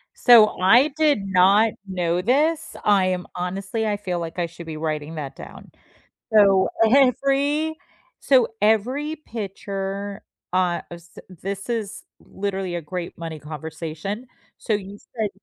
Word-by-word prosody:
So, 235 -4 +7
I 240 +11 +5
did 295 -10 +2
not 195 +4 +4
know 180 -1 -1
this. 300 - +1
I 200 -2 +4
am 180 -1 -2
honestly 195 +5 -3
I 205 - 0
feel 185 -4 -3
like 165 +1 -5
I 175 - +1
should 170 0 -10
be 155 -1 -6
writing 155 0 -3
that 145 -3 -6
down. - - -12 0.6
So, 195 -3 +5 0.2
every 280 +3 +2 0.4
so 255 -4 +4
every 255 +9 +1
picture, 200 -4 -5 0.3
uh, 180 -2 +1
s 170 -1 -12
this 195 +4 -6
is 220 -4 -3 0.2
literally 190 -2 -4
a 170 - -3
great 170 +3 -6
money 165 -2 -6
conversation. 160 - -6 0.3
So, 220 - -2
you 200 0 -4 0.2
said 215 -3 -1
195 Hz, 135 wpm, -23 LUFS, 175-225 Hz, 0.6 s, So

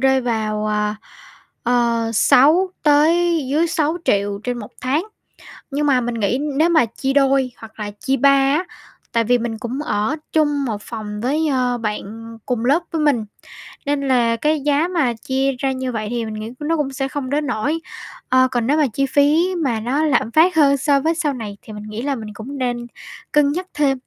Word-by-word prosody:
rơi 265 0 +3
vào, 215 -3 -1
ờ, 210 0 0 0.7
ờ, 235 -1 +1
6 310 - +5
tới 325 +3 +3
dưới 310 +4 +2
6.000.000 295 - 0
trên 245 -1 -2
1 210 - -8
tháng. 275 +7 0 0.7
Nhưng 290 +2 0
mà 265 -3 +3
mình 240 0 -3
nghĩ 225 +2 0 0.2
nếu 320 +3 +4
mà 315 -7 +4
chia 265 +4 -3
đôi 270 -2 +3
hoặc 225 0 -13
là 210 -1 -4
chia 270 0 0
ba 280 - +5
á, 275 +4 +3 0.5
tại 230 - +2
vì 245 +2 +3
mình 235 -1 -3
cũng 240 +5 -4
ở 215 -1 -1 0.2
chung 295 -3 +1
một 215 -4 -3
phòng 210 -2 -6
với, 300 +6 0
ờ, 250 -2 +1
bạn 225 +1 -5
cùng 245 -3 -2
lớp 295 +7 +3
với 325 -2 -1
mình, 275 -8 +2 0.6
nên 285 0 0
là 240 -3 +3
cái 300 +5 +1
giá 290 +3 +2
mà 320 -10 +1
chia 265 +4 -1
ra 270 - 0
như 260 -1 -3
vậy 215 -3 -3
thì 235 -1 -2
mình 220 - -5
nghĩ 215 +1 -6
nó 320 +2 0
cũng 280 -3 -2
sẽ 270 0 -2
không 270 -1 -4
đến 295 +2 -1
nỗi. 260 +7 -1 0.5
Ờ, 255 0 +5
còn 240 -3 0
nếu 295 +3 +2
mà 300 -2 +3
chi 275 - +1
phí 300 +7 +2
mà 240 -6 0
nó 255 +7 0
lạm 275 -7 +1
phát 335 +5 +4
hơn 280 -3 +5
so 280 +1 +2
với 320 +4 0
sau 310 -4 0
này 215 -5 -7
thì 215 - -11
mình 210 - -8
nghĩ 215 +1 -6
là 280 +1 -1
mình 215 -3 -7
cũng 240 +7 -8
nên 245 -2 -2 0.4
cân 295 -1 +3
nhắc 360 +5 -3
thêm. 285 -2 +1
265 Hz, 205 wpm, -20 LUFS, 230-295 Hz, 0.7 s, 6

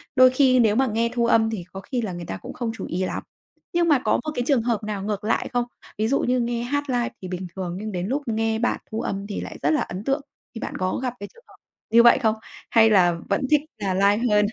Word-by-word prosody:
Đôi 255 -1 +8
khi 255 -1 +4
nếu 220 -3 +4
mà 265 +2 +3
nghe 230 +1 0
thu 240 -1 +1
âm 225 -1 +4
thì 215 -5 -4
có 195 - -6
khi 250 +2 -3
là 210 -5 -3
người 175 0 -6
ta 95 - -5
cũng - - -9
không 235 -2 -3
chú - - -6
ý 185 +2 -2
lắm. - - -4 0.5
Nhưng 345 0 +2
mà 290 -4 +5
có - - +3
một 305 - -3
cái 245 - 0
trường 270 -6 +3
hợp 230 -3 -1
nào 210 -2 -4
ngược 210 -1 -3
lại 225 - 0
không? 245 0 +1 0.3
Ví 215 - +1
dụ 275 +4 +2
như 250 +1 +1
nghe 235 0 -1
hát 285 +3 -2
live 245 -2 0
thì 185 - -6
bình 180 0 -5
thường 180 -2 -4
nhưng 215 0 -5
đến 180 0 -3
lúc 275 +6 -1
nghe 225 0 0
bạn 245 - 0
thu 220 - -2
âm 195 0 -3
thì 205 - -4
lại - - -7
rất 145 - +3
là 155 - +2
ấn 185 +4 -5
tượng, 275 +3 0 0.3
khi - - -5
bạn - - -5
có 185 +4 -1
gặp 250 - -1
cái 205 - -7
trường 475 - -20
hợp - - -18 0.4
như 235 +1 +7
vậy 235 - +7
không? 220 -1 +2 0.3
Hay 225 -1 +6
là 180 -5 +4
vẫn - - +1
thích 300 - +6 0.2
là 195 -3 -1
live 200 +4 +3
hơn? 210 0 +4
225 Hz, 280 wpm, -24 LUFS, 200-245 Hz, 0.5 s, Đôi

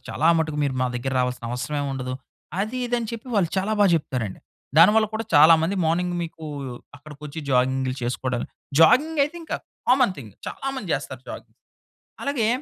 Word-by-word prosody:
చాలా 160 - +1
మటుకు 155 -2 -1
మీరు 140 -2 0
మా - - +2
దగ్గరకి 130 +2 -2
రావాల్సిన 125 -1 -2
అవసరమే 145 +4 -2
ఉండదు." 130 -1 -4 0.5
అది, 220 +5 -2
ఇది 245 - -1
అని 225 -2 -4
చెప్పి 230 +2 -7
వాళ్ళు 175 -5 +3
చాలా 205 +3 0
బాగా 200 -2 +6
చెప్తారండి. 125 -9 -4 0.4
దానివల్ల 215 +6 +7
కూడా 225 +1 -2
చాలా 155 +3 +9
మంది 190 +5 0
మార్నింగ్ 175 +2 0
మీకూ 160 -1 -8 0.5
అక్కడికొచ్చి 150 +1 -10
జాగింగ్‌లు 130 0 +1
చేసుకోడాళ్ళు, 125 0 -2 0.3
జాగింగ్ 290 - +5
అయితే 320 +4 -7
ఇంకా 325 - -3 0.3
కామన్ 250 -6 +4
థింగ్. 110 -7 -10 0.2
చాలా 270 - -5
మంది 215 -8 -6
చేస్తారు 130 -2 -6
జాగింగ్. - - -10 0.7
అలాగే 270 -6 0
160 Hz, 165 wpm, -24 LUFS, 130-215 Hz, 0.7 s, చాలా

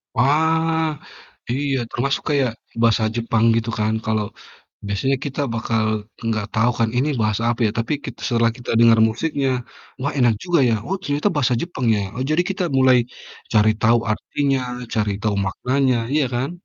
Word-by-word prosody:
Wah, 160 +3 +2 0.5
iya 140 +1 0
termasuk 135 +3 -1
kayak 135 -5 +2 0.3
bahasa 115 -1 +3
Jepang 115 -1 0
gitu 115 0 -1
kan, 110 +1 +1
kalau 110 -1 0 0.6
biasanya 135 +7 0
kita 145 +1 -3
bakal 115 -1 0 0.5
gak 105 -1 -3
tahu 115 +2 +3
kan, 115 -1 +2
"Ini 145 +4 +2
bahasa 110 +1 0
apa 120 - -4
ya?" - - -1
Tapi 115 +6 -1
kit 125 -3 -7
setelah 115 -1 +2
kita 120 - -5
dengar 115 -1 +6
musiknya, 135 +3 -1 0.5
"Wah, 145 +2 -1
enak 120 -3 +4
juga 175 -3 +2
ya, - - +2
oh 195 - -1
ternyata 145 +6 0
bahasa 125 -4 +2
Jepang 140 -9 -3
ya." - - 0 0.2
Oh, 130 - -2
jadi 165 +3 +3
kita 190 -1 -2
mulai 130 -1 +5 0.6
cari 110 0 +5
tahu 115 +1 +4
artinya, 135 +4 -1 0.3
cari 105 -2 +1
tahu 105 -2 0
maknanya, 130 +5 +1 0.2
iya 150 -1 +3
kan? 130 +6 -1
125 Hz, 165 wpm, -21 LUFS, 115-145 Hz, 0.6 s, dengar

